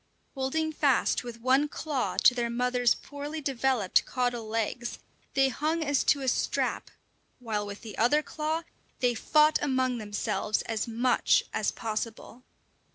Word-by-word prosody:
Holding 315 +4 -1
fast 280 -5 +2
with 235 -1 -8
one 265 +4 +3
claw 290 -3 -3
to - - +6
their 240 -1 -1
mother's 245 0 +2
poorly 290 +2 -7
developed 265 -7 +1
caudal 245 -3 -2
legs, 225 +2 -2 0.4
they 270 -1 +4
hung 315 +5 -1
as 285 -2 +1
to 285 - +3
a 265 - -3
strap, 255 - 0 0.5
while 215 -4 -3
with 205 0 -8
the 220 -3 -8
other 290 +7 +3
claw 315 +2 -2 0.4
they 245 -1 +2
fought 305 +6 +3
among 260 -3 0
themselves 210 0 -2
as 225 0 -2
much 240 +2 +2
as - - +1
possible. 225 +1 -5
250 Hz, 145 wpm, -28 LUFS, 230-285 Hz, 0.5 s, to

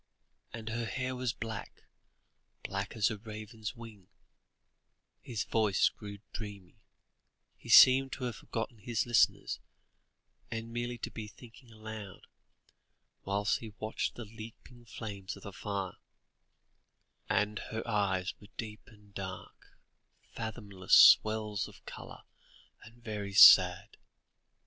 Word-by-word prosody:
And 115 0 -7
her 115 +1 -2
hair 130 +1 -3
was 125 -1 -1
black 115 -3 -7 0.8
black 100 +2 -4
as 110 +1 +2
a 105 - -6
raven's 110 +2 -7
wing" 110 -5 -12 1.1
his 115 -4 -3
voice 110 -3 +2
grew 105 -2 -10 0.2
dreamy, 105 -2 -9 0.8
he - - -14
seemed 135 +1 +8
to 130 - -6
have 120 -4 -3
forgotten 115 0 -5
his 115 +2 -1
listeners, 120 -1 +2 0.9
and 115 +1 -6
merely 120 0 -3
to - - -6
be 110 -2 -7
thinking 120 +2 -16
aloud, 110 -3 -9 1.0
whilst 100 +1 0
he 110 -3 -10
watched 110 +1 -3
the 120 - -7
leaping 115 +2 -12
flames 100 -4 -7
of - - -15
the 100 - -8
fire 100 -3 -4 1.3
"and 105 0 +1
her 110 +2 -5
eyes 95 -4 0
were 100 - -14
deep 110 -2 -6
and 105 -2 -20
dark, 95 -1 -9 0.6
fathomless 105 -5 +5
wells 105 -1 -3
of - - -17
colour, - - -10 0.6
and 115 +2 -16
very 105 -3 -5
sad." 95 +1 +8
110 Hz, 120 wpm, -31 LUFS, 100-115 Hz, 1.3 s, seemed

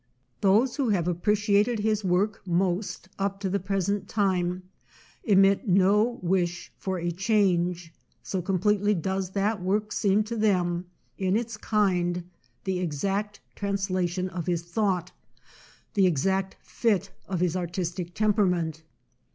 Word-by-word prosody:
Those 220 +7 +3
who 270 -5 +1
have 180 -5 +1
appreciated 210 +5 +2
his 215 0 0
work 195 +3 +1
most 180 +2 -1
up 195 0 -1
to 190 -2 -1
the 200 - +1
present 195 +1 -1
time 185 -3 0 0.6
emit 195 +1 +4
no 205 +5 +3
wish 175 -1 0
for 190 -1 -2
a 175 0 -2
change, 180 -3 +1 0.3
so 190 - -2
completely 205 +3 +1
does 190 +2 -2
that 205 0 0
work 210 +3 0
seem 205 +1 +2
to 225 +2 -5
them, 180 -5 +1 0.3
in 190 +1 +2
its 230 -1 -3
kind, 180 -5 +1 0.4
the 190 -2 -1
exact 195 +5 -2
trans 200 -1 -2
lation 185 0 -1
of 175 -1 -5
his 170 -2 0
thought, 180 -1 -1 0.8
the 195 -3 +4
exact 190 +4 0
"fit" 200 -5 0 0.2
of 185 -2 -2
his 180 -1 +1
artistic 175 0 -3
temperament. 180 -7 +1
190 Hz, 135 wpm, -27 LUFS, 180-205 Hz, 0.8 s, emit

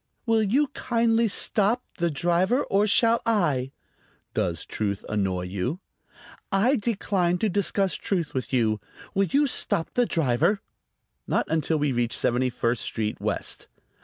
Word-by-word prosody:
"Will 225 -1 +3
you 260 +8 +2
kindly 230 -3 +1
stop, 215 +3 +1 0.2
the 170 0 +2
driver, 175 - +1
or 200 +2 +2
shall 230 +2 +4
I?" 150 - +1 0.6
"Does 85 -3 -1
truth 100 -2 -3
annoy 95 -4 -1
you?" 100 - -3 0.7
"I 220 +8 +3
decline 195 -5 0
to 215 +4 0
discuss 195 0 0
truth 175 -6 -2
with 130 - -3
you. 110 -5 +1 0.3
Will 195 0 +2
you 285 +6 +3
stop 170 - 0
the 245 -1 +2
driver?" 160 - +1 0.7
"Not - - +1
until 160 0 +1
we 145 -1 +1
reach 120 -1 0
Seventy 125 +2 +1
first 120 -1 -1
Street 110 -1 -3
West." - - -3
175 Hz, 140 wpm, -25 LUFS, -, 0.7 s, shall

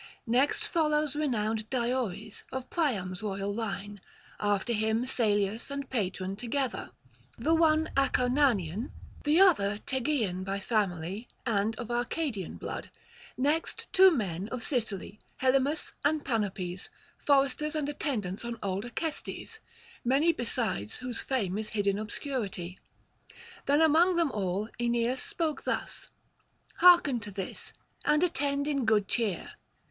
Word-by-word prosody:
Next 255 +5 +2
follows 300 -3 +1
renowned 220 -7 -1
Diores, 235 -5 -2
of 260 -1 -5
Priam's 200 - 0
royal 200 -1 -2
line; 205 -2 -4 0.4
after 205 +3 +1
him 220 +2 +1
Salius 215 -3 +1
and 280 -1 -5
Patron 190 -5 -1
together, 245 +3 -2 0.5
the 310 +8 +2
one 320 -1 +3
Acarnanian, 250 - +2 0.4
the 300 +4 +4
other 210 - +5
Tegean 245 -9 0
by 195 +1 -2
family 200 0 -1 0.2
and 220 -1 +1
of 240 +1 -6
Arcadian 240 - -2
blood; - - -5 0.5
next 295 +5 -1
two 380 0 +9
men 200 - -2
of 245 -2 -4
Sicily, 215 -6 -2 0.2
Helymus 270 +3 +2
and 300 +1 +1
Panopes, 195 -6 -2 0.3
foresters 285 +2 +2
and 300 -2 0
attendants 240 - -2
on 235 0 -4
old 195 +2 -1
Acestes; 320 - -4 0.4
many 280 +7 +4
besides 230 - -2
whose 250 -2 -4
fame 210 -7 -1
is 215 - -3
hid 205 -2 -1
in 200 0 +2
[303 210 -5 -3
338]obscurity. - - -22 0.9
Then 290 +2 +4
among 325 +3 +5
them 335 -4 +2
all 200 0 -1
Aeneas 240 +1 +1
spoke 320 -3 -2
thus: - - -2 0.7
'Hearken 345 -8 +7
to 210 -1 -7
this, 195 -2 -5 0.3
and 300 +3 +3
attend 285 -4 0
in 280 -4 0
good 215 -3 +3
cheer. 210 -7 -1
240 Hz, 130 wpm, -30 LUFS, 205-285 Hz, 0.9 s, two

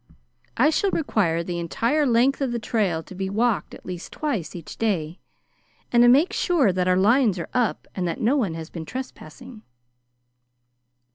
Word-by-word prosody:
I 300 - +4
shall 395 +5 +1
require 195 - 0
the 175 0 -4
entire 235 - 0
length 250 +4 +2
of 265 -3 0
the 240 - -1
trail 205 -8 -1
to 190 - -12
be 190 +1 -4
walked 225 +2 0
at - - -16
least 180 -1 -7
twice 235 - -3
each 170 -3 -9
day, 175 -7 -1 0.7
to 240 0 +5
make 280 +9 +4
sure 300 - +2
that 180 0 0
our 180 0 +3
lines 215 +1 +3
are 170 - -5
up 245 -3 0
and 180 -2 -2
that 170 - -3
no 240 +6 +2
one 205 - 0
has 165 0 -8
been 165 - -6
trespassing." 250 +2 -9
220 Hz, 170 wpm, -24 LUFS, 175-255 Hz, 0.7 s, to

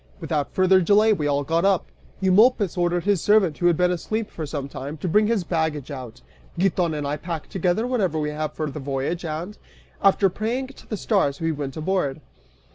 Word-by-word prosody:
Without 155 -4 -2
further 185 0 +4
delay 210 +4 +4
we 150 -7 -1
all 145 0 +1
got 165 +4 0
up. 195 -2 +2 0.4
Eumolpus 200 +1 +4
ordered 175 -1 0
his 200 -4 +1
servant, 205 -7 +3
who 175 - +3
had 170 -2 +3
been 180 0 +3
asleep 215 +5 -3
for 155 -2 -5
some 140 -2 -4
time, 140 +2 -7
to 165 - -4
bring 210 +5 +3
his 225 -4 +1
baggage 160 -4 -2
out. 125 - -8 0.4
Giton 175 -3 +1
and 145 -1 -3
I 145 +1 -2
pack 165 0 -6
together 185 +4 0
whatever 205 -11 0
we 150 0 -1
have 150 0 -3
for 155 - -3
the 150 - -6
voyage 140 +5 -3
and, 170 +6 -5 0.4
after 195 0 +4
praying 235 +8 -2
to 275 - -15
the 215 - -3
stars, 185 -10 +1
we 165 0 0
went 145 -2 -5
aboard. 155 -4 -1
175 Hz, 200 wpm, -23 LUFS, 150-195 Hz, 0.4 s, further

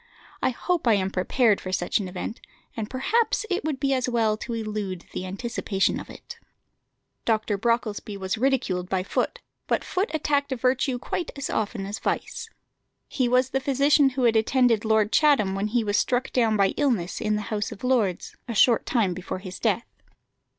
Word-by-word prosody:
I - - +3
hope 330 +4 -1
I 225 - +6
am 190 -1 -1
prepared 210 +3 +2
for 185 - -5
such 180 +1 0
an 200 - -3
event, 180 +5 -6 0.3
and 220 -1 -4
perhaps 440 - +1
it 360 - 0
would 300 -3 -2
be 275 0 +1
as 255 -1 0
well 225 -3 +2
to 235 +2 -5
elude 210 -5 -4
the 185 - -4
anticipation 200 -1 -1
of - - -10
it." - - -11 0.8
Dr. 220 -2 +1
Brocklesby 215 -1 -1
was 190 0 -2
ridiculed 220 -8 0
by 185 -1 0
Foote, - - -2 0.3
but - - +1
Foote 385 +6 -1
attacked 285 -2 0
virtue 255 +1 +1
quite 320 +6 -3
as 280 - -4
often 210 -2 -2
as 205 +2 -5
vice. 445 - -3 0.6
He 255 -3 0
was 255 +1 +3
the 270 - +1
physician 280 +1 +4
who 260 - +1
had 230 -2 +4
attended 230 0 +3
Lord 220 -1 +3
Chatham 280 -11 +4
when 195 +2 -1
he 235 +2 +1
was 205 -1 0
struck 255 +1 0
down 225 -4 +3
by 195 -1 +4
illness 235 -12 0
in 215 -1 +1
the 210 - -2
House 205 -1 -2
of - - -10
Lords, 235 -8 0
a 235 - -4
short 240 -1 +4
time 215 -8 +1
before 185 +1 -5
his 185 -1 -8
death. 225 +1 +1
230 Hz, 185 wpm, -25 LUFS, 200-260 Hz, 0.8 s, I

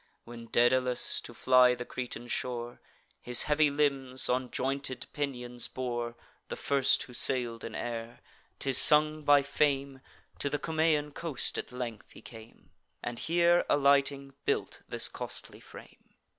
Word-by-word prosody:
When 115 0 -10
Daedalus, 125 +1 +2
to - - -10
fly 125 -1 +5
the 125 0 -6
Cretan 120 -1 -6
shore, 120 -1 -4 0.4
His 125 -1 0
heavy 150 0 +3
limbs 135 -3 -1
on 125 0 0
jointed 135 -1 -3
pinions 125 -4 -3
bore, 120 -2 -4 0.3
(The - - -5
first 140 -1 +2
who 125 - -13
sail'd 120 -2 0
in 110 - -6
air,) 115 0 -5 0.4
'tis 135 -2 +2
sung 155 0 +5
by 145 -1 +5
Fame, 140 -2 0 0.4
To 140 - -1
the 145 - -1
Cumaean 155 -1 +1
coast 150 -3 -2
at - - -7
length 120 -4 -6
he - - -13
came, 115 -1 -14 0.3
And 120 -1 -4
here 175 +1 +3
alighting, 140 -1 +2
built - - -2
this - - +1
costly - - -7
frame. - - -15
130 Hz, 145 wpm, -30 LUFS, 120-145 Hz, 0.4 s, fly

